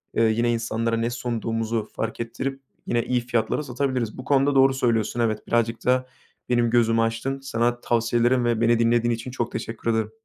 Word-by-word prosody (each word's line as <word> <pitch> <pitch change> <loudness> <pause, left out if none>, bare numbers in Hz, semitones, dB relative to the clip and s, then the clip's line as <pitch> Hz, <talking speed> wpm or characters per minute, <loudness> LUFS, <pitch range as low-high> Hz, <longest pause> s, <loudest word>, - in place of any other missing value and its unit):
eee, 115 - +3
yine 115 +2 +2
insanlara 115 0 -1
ne 115 +1 0
sunduğumuzu 115 -2 -2
fark 115 0 -3
ettirip 135 +4 -4 0.3
yine 120 -1 +1
iyi 125 -1 +1
fiyatlara 120 +3 -1
satabiliriz. 130 -4 -2
Bu 130 - -7
konuda 140 0 +2
doğru 135 0 +5
söylüyorsun, 120 -3 0
evet. 110 -2 -1
Birazcık 115 -1 0
da 130 0 +2 0.4
benim 120 -1 +2
gözümü 115 -1 +3
açtın. 115 +4 -1
Sana 120 -2 -1
tavsiyelerin 120 +1 +2
ve 115 -1 +1
beni 115 0 +3
dinlediğin 120 0 +2
için 115 +2 -5
çok 120 -2 -3
teşekkür 115 +1 -4
ederim. 110 -1 -1
120 Hz, 175 wpm, -24 LUFS, 115-125 Hz, 0.4 s, doğru